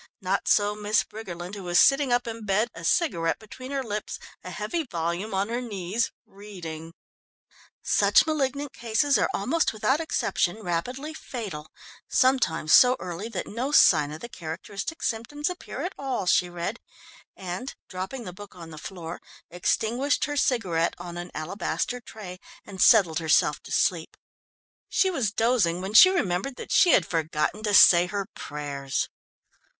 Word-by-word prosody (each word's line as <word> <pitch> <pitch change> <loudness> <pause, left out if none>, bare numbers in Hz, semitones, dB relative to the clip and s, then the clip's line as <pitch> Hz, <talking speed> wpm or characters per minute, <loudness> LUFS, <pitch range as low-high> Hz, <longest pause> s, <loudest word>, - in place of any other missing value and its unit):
Not 190 -1 -1
so 205 0 +3
Miss 210 0 +1
Briggerland, 180 -4 -8
who 205 - -6
was 175 -1 +2
sitting 275 -1 +4
up 245 0 +2
in 230 -1 -6
bed, 210 +3 +1
a 165 - -10
cigarette 165 - +1
between 255 +4 -11
her 275 -1 -2
lips, 210 -2 -4 0.3
a - - -7
heavy 345 -1 -3
volume 175 - -3
on 195 +3 0
her 240 +2 -2
knees, 210 -1 -2
reading: 165 -5 -9 0.9
"Such - - +4
malignant 285 -2 -2
cases 240 +5 +1
are - - +1
almost 270 +11 0
without 265 +7 +1
exception 220 - -1
rapidly 250 - -3
fatal, 205 - -7 0.4
sometimes 255 -11 +2
so 250 0 +7
early 185 +5 -6
that 200 -5 -4
no 250 +6 -3
sign 150 - +5
of 155 - -8
the - - -6
characteristic 195 - -6
symptoms 290 +8 -2
appear 360 - -7
at 370 - -3
all," 260 -8 -2
she 180 0 +3
read 175 +6 -4 0.6
and, 185 +7 -6
dropping 190 +8 -6
the 180 -4 -8
book 205 +1 -12
on 165 -2 -10
the 155 - -9
floor, 170 -1 -7 0.3
extinguished 230 +10 0
her 290 - -4
cigarette 190 - +1
on 175 0 -8
an 175 +1 -6
alabaster 200 +9 -3
tray, 190 -6 -10 0.3
and 190 -2 -7
settled 180 -8 +5
herself 155 -2 +2
to - - -12
sleep. 165 -3 0 0.7
She 380 - +2
was 250 - 0
dozing 225 -7 +1
when 190 +3 -5
she 370 +12 +10
remembered 250 - -1
that - - -9
she 360 -3 +5
had 180 - +4
forgotten 160 +4 -1
to 210 -2 +1
say 175 -1 +8
her 200 +1 -3
prayers. 140 -2 -4
205 Hz, 160 wpm, -26 LUFS, 175-250 Hz, 0.9 s, she